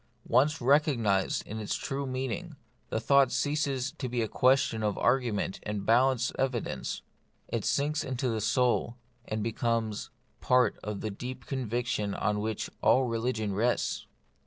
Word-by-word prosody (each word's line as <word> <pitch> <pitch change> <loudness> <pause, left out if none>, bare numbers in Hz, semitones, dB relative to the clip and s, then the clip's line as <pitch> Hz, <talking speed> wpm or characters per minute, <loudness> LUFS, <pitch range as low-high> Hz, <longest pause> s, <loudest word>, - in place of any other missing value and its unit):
Once 145 +6 +3
recognised 120 -8 +2
in 110 +2 -6
its 105 - -2
true 140 0 -3
meaning, 130 +6 -3 0.3
the - - -1
thought 140 +2 +4
ceases 140 -1 0
to 130 - -5
be 120 -1 0
a - - -1
question 130 0 +3
of 105 -1 0
argument 120 -7 +1
and 105 -2 -4
balanced 125 +1 +3
evidence; 130 -3 -2 0.5
it - - -2
sinks 150 +2 +1
into 130 0 -2
the 110 -2 -1
soul, 120 +2 +1 0.3
and 110 -1 -2
becomes 115 -1 -1 0.3
part 125 -1 +3
of 105 -2 -4
that 105 -2 -5
deep 125 0 -6
conviction 120 -5 -2
on 105 +1 0
which 110 0 -2
all 130 - +5
religion 115 -3 -1
rests. 115 +5 0
120 Hz, 145 wpm, -29 LUFS, 110-130 Hz, 0.5 s, all